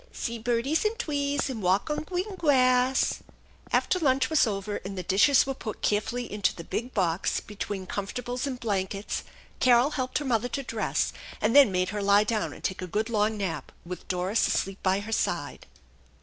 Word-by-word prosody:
See 235 Hz, 0 st, -4 dB
birdies 240 Hz, +6 st, 0 dB
an' 425 Hz, +1 st, 0 dB
twees 285 Hz, -, -1 dB
and 250 Hz, -5 st, -4 dB
walk 190 Hz, -, +1 dB
on 300 Hz, -, -2 dB
gween 375 Hz, +4 st, -3 dB
gwass! 255 Hz, -5 st, +3 dB, 0.3 s
" -, -, -27 dB
After 365 Hz, -, +2 dB
lunch 265 Hz, -3 st, +2 dB
was 310 Hz, -6 st, +4 dB
over 205 Hz, 0 st, -3 dB
and 195 Hz, +1 st, -7 dB
the 185 Hz, -, -3 dB
dishes 200 Hz, -, +4 dB
were 270 Hz, -, -2 dB
put 220 Hz, -5 st, -7 dB
carefully 235 Hz, +4 st, -1 dB
into 205 Hz, -2 st, +1 dB
the 170 Hz, -, -8 dB
big 240 Hz, +8 st, -4 dB
box 180 Hz, -3 st, +1 dB
between 200 Hz, -2 st, -5 dB
comfortables 245 Hz, +7 st, -3 dB
and 255 Hz, -3 st, -4 dB
blankets 200 Hz, -2 st, -2 dB, 0.4 s
Carol 250 Hz, +3 st, +5 dB
helped 255 Hz, -3 st, -1 dB
her 295 Hz, -, -3 dB
mother 245 Hz, -1 st, +1 dB
to 275 Hz, +3 st, -3 dB
dress, 230 Hz, -3 st, -1 dB, 0.3 s
and 230 Hz, -, +1 dB
then 280 Hz, -7 st, +8 dB
made 185 Hz, 0 st, 0 dB
her 210 Hz, 0 st, -3 dB
lie 200 Hz, +1 st, +5 dB
down 215 Hz, 0 st, -1 dB
and -, -, -12 dB
take 190 Hz, -, -2 dB
a 185 Hz, -, -4 dB
good 215 Hz, +6 st, -2 dB
long 215 Hz, 0 st, +1 dB
nap, 180 Hz, -7 st, -4 dB
with 180 Hz, +1 st, -7 dB
Doris 185 Hz, +4 st, +1 dB
asleep 195 Hz, 0 st, -1 dB
by 190 Hz, +1 st, +1 dB
her 215 Hz, +2 st, -7 dB
side. -, -, -2 dB
225 Hz, 190 wpm, -27 LUFS, 195-260 Hz, 0.4 s, then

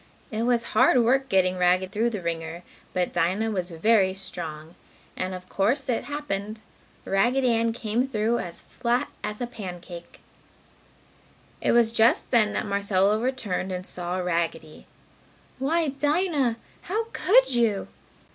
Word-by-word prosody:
It 225 Hz, +2 st, -1 dB
was 240 Hz, -1 st, +2 dB
hard 235 Hz, +3 st, +5 dB
work 265 Hz, +3 st, +2 dB
getting 185 Hz, -1 st, +2 dB
Raggedy 185 Hz, +1 st, +2 dB
through 225 Hz, +4 st, +1 dB
the 210 Hz, -6 st, -5 dB
wringer, 165 Hz, 0 st, -4 dB, 0.3 s
but 180 Hz, -1 st, -1 dB
Dinah 185 Hz, +6 st, +1 dB
was 185 Hz, -3 st, -2 dB
very 190 Hz, +2 st, +2 dB
strong. 160 Hz, -4 st, -5 dB, 0.4 s
And 185 Hz, 0 st, -3 dB
of 185 Hz, 0 st, -10 dB
course 245 Hz, +10 st, 0 dB
it 235 Hz, -, 0 dB
happened! 215 Hz, -8 st, -4 dB, 0.4 s
Raggedy 245 Hz, +6 st, +2 dB
Ann 230 Hz, 0 st, +2 dB
came 230 Hz, +2 st, -1 dB
through 230 Hz, -1 st, 0 dB
as 170 Hz, -1 st, -6 dB
flat 245 Hz, 0 st, -1 dB
as 210 Hz, +3 st, -4 dB
a -, -, 0 dB
pancake. 180 Hz, -6 st, -9 dB, 1.4 s
It -, -, +2 dB
was 235 Hz, -1 st, +4 dB
just 230 Hz, +1 st, +3 dB
then, 220 Hz, -4 st, +4 dB
that -, -, -1 dB
Marcella 200 Hz, 0 st, +2 dB
returned 220 Hz, -7 st, -2 dB
and 180 Hz, 0 st, -4 dB
saw 180 Hz, 0 st, -3 dB
Raggedy. 165 Hz, -3 st, -3 dB, 0.7 s
"Why, 315 Hz, +3 st, +1 dB
Dinah! 290 Hz, -3 st, +1 dB, 0.2 s
How 425 Hz, +6 st, -2 dB
could 485 Hz, -, +4 dB
you!" 230 Hz, -5 st, +1 dB
215 Hz, 140 wpm, -25 LUFS, 185-245 Hz, 1.4 s, hard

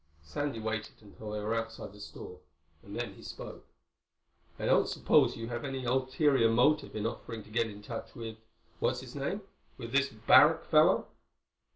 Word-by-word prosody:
Sandy 140 Hz, -, -3 dB
waited 110 Hz, 0 st, -3 dB
until 105 Hz, +1 st, -10 dB
they 105 Hz, 0 st, -3 dB
were 110 Hz, +2 st, -1 dB
outside 115 Hz, -3 st, -4 dB
the 105 Hz, -, -14 dB
store 90 Hz, -3 st, -9 dB, 0.4 s
and -, -, -10 dB
then -, -, -3 dB
he -, -, -15 dB
spoke. -, -, -9 dB, 0.9 s
"I -, -, -4 dB
don't -, -, +4 dB
suppose -, -, +3 dB
you 115 Hz, 0 st, -5 dB
have 120 Hz, -1 st, -4 dB
any 135 Hz, -2 st, -4 dB
ulterior 130 Hz, 0 st, +3 dB
motive 140 Hz, +6 st, +3 dB
in 110 Hz, 0 st, -2 dB
offering 115 Hz, -1 st, -5 dB
to 105 Hz, -, -17 dB
get 115 Hz, 0 st, +1 dB
in 105 Hz, 0 st, -11 dB
touch 115 Hz, +2 st, -7 dB
with—what's 110 Hz, -1 st, -5 dB
his -, -, -10 dB
name?—with 70 Hz, +12 st, -6 dB
this 140 Hz, 0 st, +3 dB
Barrack 145 Hz, +9 st, +5 dB
fellow?" 155 Hz, +4 st, +5 dB
115 Hz, 165 wpm, -31 LUFS, 110-135 Hz, 0.9 s, Barrack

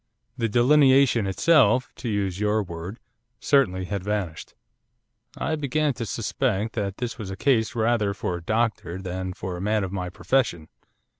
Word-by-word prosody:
The 115 Hz, -, -1 dB
delineation 130 Hz, -2 st, +4 dB
itself, 125 Hz, -, +3 dB
to 120 Hz, -, -4 dB
use 100 Hz, -3 st, -1 dB
your 105 Hz, +1 st, +1 dB
word, 85 Hz, +4 st, -7 dB, 0.4 s
certainly 95 Hz, -10 st, +2 dB
had 100 Hz, 0 st, -4 dB
vanished.' 100 Hz, -6 st, -4 dB, 0.8 s
I 160 Hz, -, -1 dB
began 150 Hz, 0 st, 0 dB
to 115 Hz, -2 st, -5 dB
suspect 110 Hz, 0 st, -1 dB
that 100 Hz, -3 st, -3 dB
this 125 Hz, +1 st, -4 dB
was 105 Hz, -3 st, -5 dB
a 95 Hz, -, -6 dB
case 120 Hz, -1 st, +1 dB
rather 110 Hz, -3 st, +1 dB
for 90 Hz, -, -3 dB
a -, -, -9 dB
doctor 110 Hz, -4 st, -1 dB
than 95 Hz, 0 st, -4 dB
for 90 Hz, 0 st, -5 dB
a -, -, -6 dB
man 105 Hz, +1 st, +1 dB
of 95 Hz, -, -4 dB
my 90 Hz, -2 st, -3 dB
profession. 90 Hz, -6 st, -1 dB
105 Hz, 160 wpm, -25 LUFS, 95-125 Hz, 0.8 s, delineation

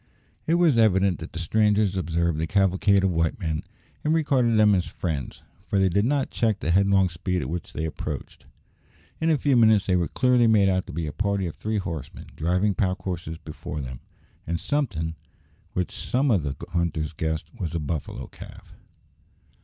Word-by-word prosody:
It 165 Hz, -, +3 dB
was 165 Hz, -8 st, +4 dB
evident 95 Hz, -4 st, +3 dB
that 80 Hz, -, -8 dB
the -, -, -7 dB
strangers 105 Hz, +3 st, +2 dB
observed 85 Hz, -3 st, 0 dB
the 80 Hz, -, -1 dB
cavalcade 95 Hz, +1 st, +3 dB
of 95 Hz, -, +2 dB
white 80 Hz, +1 st, 0 dB
men, 80 Hz, -5 st, -2 dB, 0.4 s
and 155 Hz, +2 st, +2 dB
regarded 130 Hz, -7 st, +2 dB
them 105 Hz, -1 st, +6 dB
as 90 Hz, -2 st, +1 dB
friends, 75 Hz, -7 st, -4 dB, 0.2 s
for 100 Hz, -, 0 dB
they 95 Hz, -1 st, +4 dB
did 100 Hz, +4 st, +2 dB
not 140 Hz, +1 st, 0 dB
check 110 Hz, -4 st, +1 dB
the 85 Hz, -, -1 dB
headlong 100 Hz, +1 st, +4 dB
speed 90 Hz, +1 st, -2 dB
at -, -, -5 dB
which 85 Hz, -1 st, -5 dB
they 80 Hz, -, -2 dB
approached. 80 Hz, -, -6 dB, 0.7 s
In 160 Hz, -, +1 dB
a 155 Hz, -, +4 dB
few 140 Hz, -1 st, +2 dB
minutes 110 Hz, -4 st, +5 dB
they 90 Hz, -, +2 dB
were 85 Hz, -2 st, +1 dB
clearly 125 Hz, -2 st, +3 dB
made 105 Hz, -3 st, +4 dB
out 95 Hz, -1 st, 0 dB
to -, -, -7 dB
be 80 Hz, +2 st, -3 dB
a 75 Hz, -, -5 dB
party 100 Hz, -2 st, 0 dB
of 85 Hz, -, -5 dB
three 110 Hz, 0 st, -2 dB
horsemen 80 Hz, -8 st, -5 dB
driving 90 Hz, +5 st, +1 dB
pack 95 Hz, +1 st, 0 dB
horses 85 Hz, -3 st, -4 dB
before 75 Hz, -1 st, -7 dB
them, 65 Hz, -3 st, -6 dB, 0.5 s
and 85 Hz, +1 st, -1 dB
somethin' 80 Hz, -, -1 dB, 0.6 s
which 90 Hz, -1 st, -1 dB
some 135 Hz, +2 st, 0 dB
of 100 Hz, -6 st, +3 dB
the 70 Hz, -2 st, -3 dB, 0.2 s
hunters 80 Hz, -2 st, -1 dB
guessed 80 Hz, 0 st, -3 dB
was 85 Hz, -4 st, -3 dB
a -, -, 0 dB
buffalo 75 Hz, -1 st, -4 dB
calf. -, -, -13 dB
95 Hz, 190 wpm, -25 LUFS, 80-110 Hz, 0.7 s, them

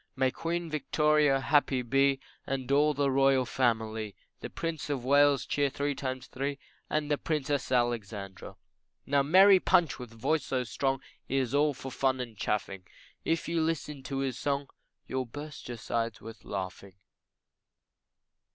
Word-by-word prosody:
May 130 Hz, 0 st, +2 dB
Queen 170 Hz, +3 st, -3 dB
Victoria 150 Hz, -2 st, +2 dB
happy 135 Hz, -2 st, +2 dB
be, 135 Hz, +2 st, +3 dB, 0.3 s
And 135 Hz, -1 st, -3 dB
all 150 Hz, +1 st, +4 dB
the 140 Hz, -1 st, +1 dB
royal 135 Hz, -1 st, +4 dB
family, 110 Hz, -4 st, -1 dB, 0.2 s
The -, -, -6 dB
Prince 165 Hz, -3 st, -4 dB
of 135 Hz, -4 st, -2 dB
Wales, 140 Hz, 0 st, +4 dB
cheer 145 Hz, -1 st, +1 dB
three 145 Hz, +1 st, -1 dB
times 130 Hz, -2 st, -4 dB
three 140 Hz, +2 st, -3 dB, 0.3 s
And 150 Hz, -1 st, -1 dB
the 145 Hz, -, +1 dB
Princess 145 Hz, -4 st, -1 dB
Alexandra. 110 Hz, -6 st, -2 dB, 0.5 s
Now 140 Hz, 0 st, +3 dB
merry 190 Hz, +7 st, +7 dB
Punch 170 Hz, -5 st, +2 dB
with 125 Hz, -2 st, -7 dB
voice 130 Hz, +7 st, 0 dB
so 130 Hz, -1 st, -1 dB
strong, 135 Hz, +2 st, -1 dB, 0.3 s
He 135 Hz, -, 0 dB
is 130 Hz, -2 st, 0 dB
all 145 Hz, 0 st, +3 dB
for 135 Hz, +1 st, -7 dB
fun 130 Hz, 0 st, +1 dB
and 120 Hz, -3 st, -5 dB
chaffing, 95 Hz, -2 st, -2 dB, 0.4 s
If 165 Hz, -, 0 dB
you 165 Hz, -1 st, 0 dB
listen 155 Hz, -3 st, -2 dB
to 135 Hz, -, -3 dB
his 130 Hz, -3 st, -2 dB
song 140 Hz, -1 st, -1 dB, 0.4 s
You'll 130 Hz, 0 st, -2 dB
burst 145 Hz, +5 st, -8 dB
your 120 Hz, -1 st, -5 dB
sides 115 Hz, 0 st, -2 dB
with 115 Hz, 0 st, -11 dB
laughing. 95 Hz, -1 st, -6 dB
135 Hz, 155 wpm, -30 LUFS, 120-145 Hz, 0.5 s, merry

